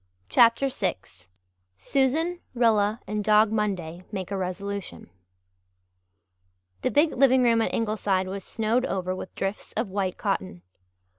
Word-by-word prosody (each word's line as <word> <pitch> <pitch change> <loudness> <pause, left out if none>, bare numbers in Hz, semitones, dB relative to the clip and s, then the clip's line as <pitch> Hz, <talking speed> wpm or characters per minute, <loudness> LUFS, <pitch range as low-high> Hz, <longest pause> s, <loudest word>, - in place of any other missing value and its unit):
CHAPTER 235 - +4
VI 210 -7 -1 0.8
SUSAN, 280 - 0 0.2
RILLA, 220 -2 +2
AND 210 0 -3
DOG 215 +1 +4
MONDAY 185 -6 -2
MAKE 190 -2 -5
A - - -1
RESOLUTION 185 - -5 1.7
The - - +1
big 300 +2 +3
living 260 0 +4
room 230 -1 +4
at - - 0
Ingleside 210 -4 0
was 195 0 -5
snowed 225 +5 0
over 185 -1 -2
with 185 - -8
drifts 195 +2 -4
of 220 -1 -2
white 190 -2 -2
cotton. 90 -1 -3
210 Hz, 130 wpm, -26 LUFS, 190-235 Hz, 1.7 s, CHAPTER